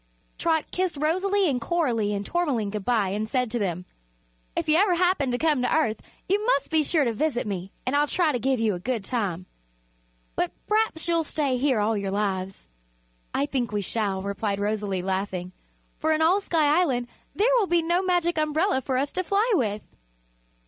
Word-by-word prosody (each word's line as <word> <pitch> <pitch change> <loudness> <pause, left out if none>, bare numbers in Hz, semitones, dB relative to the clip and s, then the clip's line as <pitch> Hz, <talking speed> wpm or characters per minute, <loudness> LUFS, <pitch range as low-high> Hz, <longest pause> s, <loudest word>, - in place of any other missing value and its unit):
Trot 320 -2 0
kissed 365 -4 -1
Rosalie 375 +6 +1
and 255 -5 0
Coralie 235 -8 0
and 200 0 -3
Tourmaline 265 - 0
good 210 -1 -4
bye 220 -4 +1
and 210 +3 -2
said 250 -2 0
to 240 - -1
them: 180 -3 -2 0.7
"If - - -2
you 310 - +4
ever 375 -1 +4
happen 355 -6 +2
to 245 - 0
come 300 -2 +2
to - - 0
Earth 225 -9 0 0.3
you 405 +2 +1
must 435 - +1
be 320 -1 +4
sure 305 0 +2
to 235 -3 0
visit 255 +1 -1
me 195 -2 -4
and 255 +3 0
I'll 295 +1 +3
try 335 0 +2
to 250 - -1
give 265 +1 +1
you 220 -2 +2
a 180 - -4
good 235 +2 -2
time. 195 -6 -2 0.9
But 175 - -1
p'raps 425 -7 0
you'll 335 -1 +2
stay 290 -4 0
here 260 -3 +2
all 215 +2 +1
your 200 -1 -2
lives." 195 - -2 0.6
"I 280 - 0
think 255 -6 -2
we 205 -1 -1
shall," 200 -1 -2
replied 200 0 -2
Rosalie, 205 -3 -1
laughing, 190 -1 -2 0.5
"for 315 - +1
in 315 +1 +2
all 365 +5 +4
Sky 320 -2 +3
Island 250 -8 0 0.3
there 470 +5 +3
will 410 - +1
be 345 -1 +2
no 345 +2 +2
Magic 350 -3 +1
Umbrella 310 +1 +1
for 260 0 -1
us 280 +2 0
to 370 - -1
fly 405 +6 +1
with." 215 - 0
260 Hz, 195 wpm, -25 LUFS, 210-330 Hz, 0.9 s, you